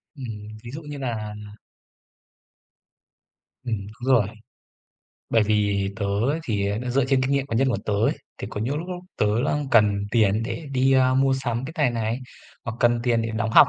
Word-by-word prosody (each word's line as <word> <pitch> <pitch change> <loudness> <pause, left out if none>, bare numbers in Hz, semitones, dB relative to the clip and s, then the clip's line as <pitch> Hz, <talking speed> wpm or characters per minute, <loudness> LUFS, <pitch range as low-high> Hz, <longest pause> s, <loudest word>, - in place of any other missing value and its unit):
Ừm, 110 -5 -7
ví 120 - -8
dụ 155 +3 -6
như 150 -1 -7
nà 110 -5 -3 2.3
Ừm, 120 -3 -1 0.3
đúng 135 - +4
rồi. 105 -5 +4 1.0
Bởi 115 -2 +4
vì 100 -2 +1
tớ 100 -3 -1
ấy 120 +11 +1
thì, 100 -3 0
à, 105 - -1
nó 125 0 -3
dựa 135 0 +3
trên 130 0 +2
kinh 130 - 0
nghiệm 140 -1 +1
cá 115 - -2
nhân 135 +2 +3
của 125 - +1
tớ 105 - 0
ấy. 105 +3 +3 0.3
Thì - - -4
có 105 - -4
những 135 +6 -1
lúc 175 +3 -6
lúc 180 0 -6
tớ 105 - +3 0.2
đang 145 -2 0
cần 105 -3 +4
tiền 110 -1 +3
để 130 +6 -4
đi, 130 +1 +3
a, 130 -1 +4
mua 135 0 +4
sắm 120 -2 -2
cái 155 - -6 0.2
này 115 -1 -2
này, 115 +4 -1 0.4
hoặc 115 -1 -4
cần 120 0 +4
tiền 120 -2 +2
để 115 - -2
đóng 110 +1 -1
học, - - +8
120 Hz, 205 wpm, -24 LUFS, 105-135 Hz, 2.3 s, học